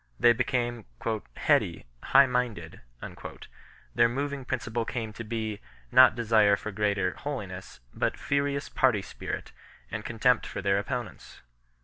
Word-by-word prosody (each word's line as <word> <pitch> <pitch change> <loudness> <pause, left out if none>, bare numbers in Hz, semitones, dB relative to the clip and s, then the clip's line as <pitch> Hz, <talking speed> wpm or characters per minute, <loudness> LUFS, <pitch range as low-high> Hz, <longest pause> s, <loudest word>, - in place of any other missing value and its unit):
They 120 - +6
became 120 -2 -1 0.3
" 80 - -8
heady, - - +2 0.2
high 140 - +6
minded 120 -10 -2 0.5
"; - - -19
their 120 0 +4
moving 140 +1 -3
principle 120 -2 -2
came 115 -2 -4
to 115 - -7
be, 110 -2 -3 0.3
not 130 -3 +7
desire 110 -3 +4
for 110 - -6
greater 100 -2 0
holi 140 -7 -4
ness, 90 -7 -10
but - - -1
furious 140 0 -1
party 120 -7 +2
spirit - - -6 0.4
and 110 -1 -4
contempt 120 +2 +2
for - - -5
their 100 0 +2
oppo 125 +2 -2
nents. - - -15
115 Hz, 145 wpm, -28 LUFS, 105-125 Hz, 0.5 s, not